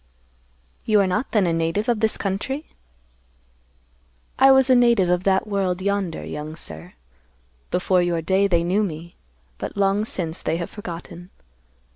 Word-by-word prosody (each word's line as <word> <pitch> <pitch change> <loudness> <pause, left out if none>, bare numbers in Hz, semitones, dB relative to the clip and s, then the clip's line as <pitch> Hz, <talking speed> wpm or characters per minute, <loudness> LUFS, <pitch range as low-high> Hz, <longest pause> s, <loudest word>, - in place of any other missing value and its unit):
"You 215 -2 +3
are 200 - +4
not 185 +7 -1
then 210 -4 +3
a 170 - +1
native 165 +7 -1
of 235 -3 +1
this 220 0 +1
country?" 235 +10 -3 1.7
"I 270 - +7
was 265 -1 +5
a 260 - +5
native 235 -7 +4
of 180 +1 0
that 190 +1 +2
world 195 -3 -1
yonder, 200 -3 -2
young 150 +1 -6
sir. 80 - -8 0.8
Before 180 0 +2
your 170 -2 -1
day, 190 +4 +2
they 170 -3 +2
knew 185 +5 +1
me; 170 -3 -5 0.4
but - - -6
long 200 +1 +2
since, 175 -6 -3
they 165 - -1
have 170 - -5
forgotten. 175 -2 -8
190 Hz, 155 wpm, -22 LUFS, 170-210 Hz, 1.7 s, I